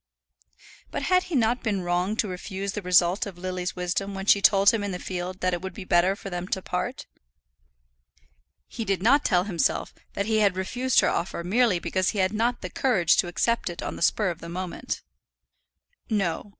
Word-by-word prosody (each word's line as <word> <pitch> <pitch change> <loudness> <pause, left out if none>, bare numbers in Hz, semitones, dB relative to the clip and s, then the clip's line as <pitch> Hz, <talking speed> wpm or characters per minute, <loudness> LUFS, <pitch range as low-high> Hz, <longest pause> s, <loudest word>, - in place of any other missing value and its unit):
But - - -4
had 365 0 +3
he 350 - -4
not 240 0 +2
been 205 -5 -1
wrong 180 +3 0
to 220 - 0
refuse 190 +1 -5
the 210 - -4
result 180 +2 +3
of 190 -3 -9
Lily's 180 0 -4
wisdom 195 +2 -2
when 195 0 -5
she 200 -1 +5
told 200 0 +6
him 225 -3 -1
in 205 - -2
the 180 - -3
field 180 +1 -5
that 185 0 +1
it 175 - -2
would 190 -1 -6
be 200 - -7
better 180 +1 +3
for 195 -1 -9
them 175 0 -4
to 190 - -1
part? - - -3 1.6
He 230 - -5
did 195 -3 -1
not 280 +6 +5
tell 180 -2 +2
himself 175 -8 -1 0.2
that 200 - -2
he 220 0 +1
had 200 -3 +3
refused 245 +7 +1
her - - +2
offer 170 -1 -2
merely 215 +2 +2
because 185 +2 0
he - - -4
had 190 +1 +1
not 235 +3 0
the 185 - -5
courage 190 -11 +3
to 175 - +2
accept 230 +5 0
it 175 - -6
on - - -4
the - - -9
spur 195 +2 +2
of 170 - -8
the 170 - -9
moment. 180 +1 -5 1.1
No. 200 -3 -1
190 Hz, 205 wpm, -26 LUFS, 180-215 Hz, 1.6 s, told